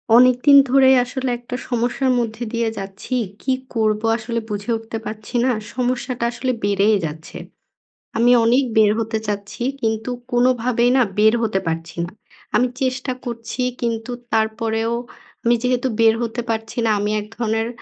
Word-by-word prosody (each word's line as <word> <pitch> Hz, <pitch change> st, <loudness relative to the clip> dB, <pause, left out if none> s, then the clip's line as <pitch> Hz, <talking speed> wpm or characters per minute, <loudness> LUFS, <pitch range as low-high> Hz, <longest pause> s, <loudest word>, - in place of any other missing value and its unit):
অনেকদিন 255 Hz, +3 st, +6 dB
ধরেই 265 Hz, 0 st, +6 dB
আসলে 255 Hz, +1 st, -3 dB
একটা 245 Hz, +1 st, -6 dB
সমস্যার 245 Hz, +2 st, 0 dB
মধ্যে 230 Hz, 0 st, -3 dB
দিয়ে 230 Hz, -1 st, 0 dB
যাচ্ছি। 195 Hz, +6 st, -5 dB, 0.3 s
কী 265 Hz, -, -1 dB, 0.2 s
করবো? 215 Hz, -1 st, +1 dB
আসলে 230 Hz, +1 st, -3 dB
বুঝে 210 Hz, +3 st, -3 dB
উঠতে 225 Hz, 0 st, -6 dB
পারছি 215 Hz, +3 st, -7 dB
না। 260 Hz, -, +3 dB, 0.2 s
সমস্যাটা 250 Hz, -1 st, -1 dB
আসলে 255 Hz, +2 st, -2 dB
বেড়েই 205 Hz, +1 st, +3 dB
যাচ্ছে। 155 Hz, +1 st, -7 dB, 0.8 s
আমি 240 Hz, +2 st, +5 dB
অনেক 250 Hz, +4 st, +4 dB
বের 215 Hz, -1 st, +6 dB
হতে 225 Hz, 0 st, -1 dB
চাচ্ছি 205 Hz, +3 st, -4 dB, 0.2 s
কিন্তু 220 Hz, +1 st, -1 dB, 0.2 s
কোনোভাবেই 245 Hz, -1 st, +2 dB
না 260 Hz, -, +5 dB, 0.2 s
বের 220 Hz, +1 st, +6 dB
হতে 210 Hz, -3 st, +1 dB
পারছি 165 Hz, 0 st, -3 dB
না। -, -, -8 dB, 0.5 s
আমি 250 Hz, -, +4 dB
চেষ্টা 255 Hz, 0 st, -1 dB
করছি 235 Hz, +1 st, -5 dB, 0.2 s
কিন্তু 230 Hz, 0 st, -2 dB, 0.2 s
তারপরেও 225 Hz, +1 st, 0 dB, 0.5 s
আমি 235 Hz, +1 st, +4 dB
যেহেতু 250 Hz, 0 st, +1 dB
বের 225 Hz, -1 st, +6 dB
হতে 235 Hz, +1 st, -3 dB
পারছি 225 Hz, +1 st, -3 dB
না -, -, +2 dB
আমি 210 Hz, +1 st, -1 dB
এক 210 Hz, -, -10 dB
ধরনের 225 Hz, -1 st, 0 dB
230 Hz, 150 wpm, -20 LUFS, 220-250 Hz, 0.8 s, অনেকদিন